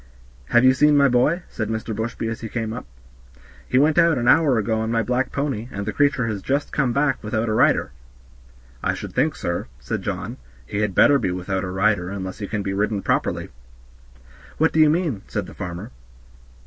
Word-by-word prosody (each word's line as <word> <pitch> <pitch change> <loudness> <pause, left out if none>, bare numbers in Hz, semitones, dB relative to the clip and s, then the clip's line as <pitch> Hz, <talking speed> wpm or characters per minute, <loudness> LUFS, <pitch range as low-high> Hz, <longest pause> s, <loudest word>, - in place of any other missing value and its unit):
"Have 120 - +3
you 130 - +7
seen 150 +2 +4
my 140 -1 +6
boy?" 140 +8 +2
said 110 -1 -4
Mr. 110 0 -3
Bushby 115 +1 -3
as 115 0 -4
we 115 - -5
came 110 -1 -3
up; 125 - -7 0.8
"he 125 - +2
went 150 +3 +4
out 165 -4 +4
an 120 0 -1
hour 145 -3 +5
ago 110 +1 0
on 110 0 -2
my 115 -1 +1
black 125 +3 -1
pony, 135 -5 -3
and 100 0 -5
the 105 - -3
creature 140 -4 +2
is 105 -3 -3
just 140 +7 -1
come 130 -4 +1
back 140 0 0
without 110 +2 -1
a 110 - 0
rider." 110 - +3 0.9
"I - - 0
should - - -7
think, 150 +5 +1
sir," 85 0 -3
said 65 0 -4
John, - - -4 0.3
"he 100 - -4
had 105 -3 -1
better 145 -1 +6
be - - -1
without 90 +1 -2
a 95 - -3
rider, 95 -1 +1
unless 95 0 -6
he 100 - -4
can 105 -1 -3
be 95 - -2
ridden 100 0 -1
properly." - - -1 1.1
"What 160 +1 +2
do 160 - +2
you 155 -1 +7
mean?" 155 - 0
said - - -3
the - - -11
farmer. 90 +6 -6
115 Hz, 210 wpm, -22 LUFS, 100-140 Hz, 1.1 s, you